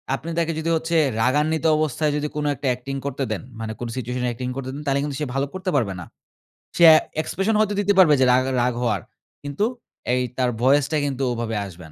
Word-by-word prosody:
আপনি 165 - -8
তাকে 165 0 0
যদি 165 - -2
হচ্ছে 165 +1 0 0.2
রাগান্বিত 150 +5 +1
অবস্থায় 155 0 0
যদি 150 +1 -2
কোনো 150 - -1
একটা 135 - -4
অ্যাক্টিং 125 +2 -4
করতে 140 0 -2
দেন, - - -2 0.2
মানে 110 -1 -4
কোন 120 - -4
সিচুয়েশনে 125 0 -2
অ্যাক্টিং 125 +1 -4
করতে 135 -1 -5
দেন 145 - -6
তাইলে 140 0 +1
কিন্তু 145 -2 -4
সে - - 0
ভালো 135 +1 +1
করতে 185 0 -4
পারবে 110 -8 +1
না। - - -8 0.7
সে 170 - +4
অ্যা 155 - +9 0.3
এক্সপ্রেশন 195 +6 -1
হয়তো 210 -1 +2
দিতে 205 0 +2
পারবে 160 -5 +7
যে - - +6
রাগ 130 +1 +3 0.2
রাগ 125 0 +1
হওয়ার। 105 -6 0 0.4
কিন্তু 145 +9 -1 0.5
এই 125 - +2 0.2
তার 125 -1 +2
ভয়েসটা 145 +3 +3
কিন্তু 135 -1 -2
ওভাবে 115 -1 -3
আসবে 85 -3 -12
140 Hz, 210 wpm, -22 LUFS, 125-155 Hz, 0.7 s, অ্যা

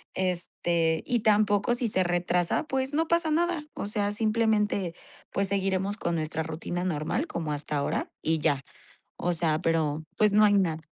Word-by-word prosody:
este, 170 -3 0
y 245 - +1
tampoco 210 +1 +3
si 240 -1 -1
se 190 -3 +2
retrasa, 175 0 +1
pues 265 0 -1
no 320 +2 +1
pasa 335 -1 +2
nada, 340 -1 0
o - - -4
sea, 205 -1 0
simplemente, 215 -4 +1 0.4
pues 200 0 0
seguiremos 195 +1 0
con 170 - -1
nuestra 160 0 -2
rutina 165 +2 -4
normal, 175 - -1
como 160 - -3
hasta 145 0 -2
ahora, 140 - -1
y 160 0 +2
ya. 140 -2 +1 0.6
O 175 - +1
sea, 160 -2 +1
pero 160 -2 0
pues 210 -1 +4
no 210 +1 +6
hay 205 - +4
nada. 170 -6 +1
185 Hz, 170 wpm, -27 LUFS, 165-215 Hz, 0.6 s, no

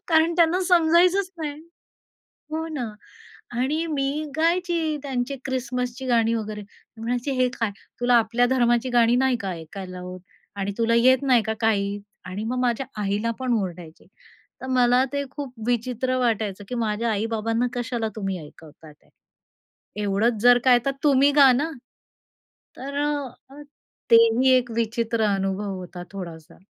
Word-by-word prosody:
कारण 325 0 +3
त्यांना 345 +2 +3
समजायचंच 355 +2 +4
नाही. 300 -1 -5 0.9
हो, 320 +1 -3
ना 275 -7 -4 0.6
आणि 275 +7 -1
मी 295 0 -1
गायची 335 -1 +1
त्यांची 270 -1 -3
क्रिसमसची 250 0 -3
गाणी 230 -2 +2
वगैरे. 215 -2 -4 0.3
म्हणायची, 245 +4 -2
"हे 255 - +3
काय, 230 -3 0 0.3
तुला 245 0 +3
आपल्या 235 +1 +3
धर्माची 240 -1 +2
गाणी 240 0 +4
नाही 265 -1 +2
का 195 - -3
ऐकायला 180 +2 -8
होत 180 0 -8 0.4
आणि 200 0 -2
तुला 230 0 +2
येत 255 +2 +4
नाही 255 -4 +4
का 220 +1 -2
काही?" 205 -2 +1 0.3
आणि 190 +4 -5
मग 250 +2 -2
माझ्या 250 +1 0 0.2
आईला 205 +3 -1
पण 255 -2 0
ओरडायची. 175 -3 -7 0.5
तर 260 - -7
मला 250 0 +3
ते 280 0 -1
खूप 280 -3 -7
विचित्र 250 +1 -1
वाटायचं 215 -5 -1
की - - -4
माझ्या 230 0 -1
आई-बाबांना 225 +2 -1
कशाला 240 -2 -2
तुम्ही 195 -3 -3
ऐकवतातेत. 155 0 -17 0.9
एवढंच 210 +3 +1
जर 245 0 +7
काय 250 -2 +6
तर 275 - +2
तुम्ही 280 -1 +5
गा 275 -2 +8
ना. 290 +6 0 1.1
तर 280 +2 -6 0.5
अ, 280 +2 -12 0.5
तेही 230 +3 +6
एक 245 -1 0
विचित्र 230 0 0
अनुभव 195 +1 -2
होता 180 -1 -8
थोडासा. 170 -5 -9
240 Hz, 140 wpm, -24 LUFS, 215-265 Hz, 1.1 s, गा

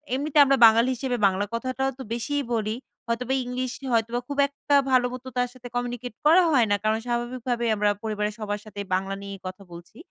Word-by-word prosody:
এমনিতে 295 +2 -2
আমরা 275 0 +3
বাঙালি 230 +3 +5
হিসেবে 250 0 -2
বাংলা 195 +2 0
কথাটাও 255 +3 -1
তো - - -5
বেশিই 285 +5 -2
বলি। 215 -1 -1 0.3
হয়তোবা 250 +3 -1
ইংলিশে 255 +2 -4
হয়তোবা 230 +1 +1
খুব 285 0 -5
একটা 285 0 -1 0.2
ভালোমতো 255 0 +1
তার 245 0 +1
সাথে 250 -1 -11
কমিউনিকেট 245 0 -3
করা 340 +4 +7
হয় 250 -6 +4
না। - - +5
কারণ 215 +1 +2
স্বাভাবিকভাবে 240 0 -2
আমরা 210 0 +2
পরিবারের 210 -1 -2
সবার 210 -1 -3
সাথেই 205 -1 -7
বাংলা 195 +1 -2
নিয়েই 200 0 -8
কথা 185 +2 -8
বলছি। 170 0 -12
240 Hz, 185 wpm, -25 LUFS, 215-255 Hz, 0.3 s, করা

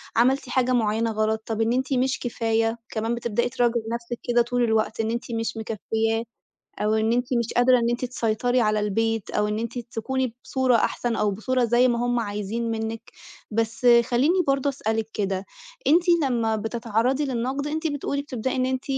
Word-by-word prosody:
عملتِ 255 +2 +2
حاجة 255 0 +1
مُعيَّنة 225 -1 +1
غلط، 220 0 0
طب 225 0 -2
إن 225 +1 +2
أنتِ 260 +2 0
مش 260 +1 +1
كفاية، 225 -1 0
كمان 225 +1 -2
بتبدأي 235 +1 -1
تراجعي 240 -2 +1
نفسِك 235 0 -5
كده 240 -1 +3
طول 245 +1 0
الوقت، 220 -1 +1
إن 225 0 0
أنتِ 235 +1 -4
مش 225 0 -2
مكفيَّاه، 225 +1 -1 0.6
أو 210 +1 +2
إن 220 +1 +2
أنتِ 245 +1 +1
مش 235 -1 -2
قادرة 250 +1 +5
إن 235 0 +1
أنتِ 240 +1 -1
تسيطري 245 0 0
على 215 -2 +2
البيت، 225 +1 -1
أو 210 0 0
إن 210 0 -1
أنتِ 230 +2 -4
تكوني 240 +1 -3
بصورة 260 -2 +2
أحسن، 235 +1 0
أو 210 - +1
بصورة 245 +5 0
زي 240 +2 +4
ما 240 0 0
هُم 245 0 +1
عايزين 210 +2 -3
منِّك، 225 0 -4 0.4
بس 225 +3 -1 0.2
خلّيني 290 +11 +2
برضه 275 +1 +2
أسألِك 220 -5 -2
كده، 195 -2 -1 0.4
أنتِ 335 +4 +5 0.2
لمّا 230 -4 +1
بتتعرَّضي 230 +5 0
للنقد، 265 +2 -2
أنتِ 315 +2 -2
بتقولي 285 -1 -2
بتبدأي 260 -2 -3
إن 255 0 +1
أنتِ 260 0 -2
235 Hz, 180 wpm, -24 LUFS, 220-250 Hz, 0.6 s, قادرة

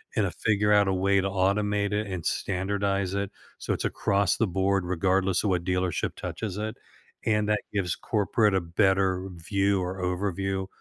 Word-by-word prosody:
and, - - +2
uh, - - -2
figure 105 -1 +3
out 100 -1 +5
a 95 - +2
way 100 +1 +2
to 100 - -1
automate 100 +2 +1
it 105 +1 -1
and 90 -4 -5
standardize 100 0 -1
it 100 -1 -2 0.3
so - - -1
it's - - -3
across 100 -2 +1
the 115 - +2
board 95 0 +1
regardless 95 +1 +1
of 105 - +1
what 90 -2 0
dealership 90 -1 -1
touches 105 -4 -5
it, 110 +2 -3 0.5
and 105 -1 +1
that 105 0 +2
gives 95 -4 0
corporate 105 -1 +1
a 95 - +2
better 95 +2 +1
view 95 +3 0
or 90 +1 -4
overview 95 +1 -1
95 Hz, 180 wpm, -27 LUFS, 95-100 Hz, 0.5 s, out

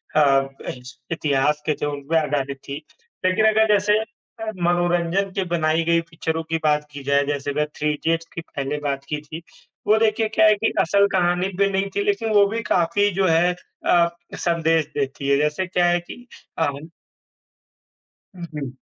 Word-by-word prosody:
अ, 135 -2 +4 0.2
इत 125 - -7 0.3
इतिहास 150 -2 +1
के 155 - +3
थे - - +1
उन 145 -1 -4
पे 165 - +3
आधारित 140 -2 -2
थी, 140 - -3 0.5
लेकिन 185 +4 +3
अगर 220 +1 +3
जैसे 205 +1 +3
अ, 220 0 -8
मनोरंजन 175 +2 +1
के 195 - 0
बनाई 155 0 +1
गई 170 0 +3
पिक्चरों 160 0 -3
की 165 - +2
बात 150 -1 +2
की 145 -1 -9
जाए 140 +1 +2
जैसे 145 0 -2
वह 150 - +2
थ्री 150 - 0
इडियट्स 165 +2 -1
की 165 - -3
पहले 140 -2 -4
बात 135 0 -3
की 150 -1 -2
थी। 155 +2 -9 0.5
वो 215 - +5
देखिए 220 0 +2
क्या 220 0 +3
है 215 - +5
कि - - 0
असल 200 +4 +3
कहानी 180 0 +2
भी 200 0 +4
नहीं 195 0 0
थी 405 - +1
लेकिन 395 - 0
वो 205 -1 +6
भी 225 +3 -3
काफ़ी 175 +5 +3
जो 190 -1 +2
है 170 +2 +3 0.3
अ, 170 -1 +4 0.3
संदेश 165 -2 +1
देती 140 0 -2
है। 140 - +4
जैसे 150 +5 0
क्या 180 -1 +1
है 175 0 +2
कि 245 +8 -11 0.3
अ - - +3 1.7
हुँ, 175 -1 -7
हुँ। 140 -4 -5
165 Hz, 185 wpm, -22 LUFS, 150-195 Hz, 1.7 s, वो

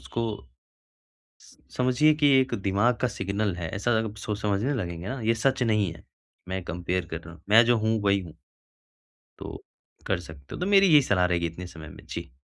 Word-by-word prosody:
उसको 115 0 -4 1.2
स - - -19 0.2
समझिए 130 +5 +4
कि 150 -1 +3
एक 130 0 -2
दिमाग 105 +5 +2
का 125 - +3
सिग्नल 100 -1 -2
है, 85 -2 -4
ऐसा 105 +4 0 0.3
सोच 105 -1 -4
समझने 105 +7 0
लगेंगे 85 -4 -4
ना, 130 -1 -4
ये 115 +1 +2
सच 130 +2 +1
नहीं 105 -6 +1
है, - - -16 0.4
मैं 95 0 -3
कंपेयर 90 +2 -2
कर 85 0 -4
रहा 80 +1 -12
हूँ। - - -19
मैं 115 +3 +8
जो 120 0 +4
हूँ, 110 +1 +1
वही 100 -1 +3
हूँ। 85 -3 -10 1.0
तो, - - -8 0.4
कर 85 - 0
सकते 80 -5 -11
हो - - -7
तो 180 - -1
मेरी 195 0 +7
यही 150 -4 +7
सलाह 90 -7 +2
रहेगी 85 -1 0
इतने 85 +2 -7
समय 80 -3 -10
में। - - -13
जी। - - -6
100 Hz, 200 wpm, -26 LUFS, 90-120 Hz, 1.2 s, मैं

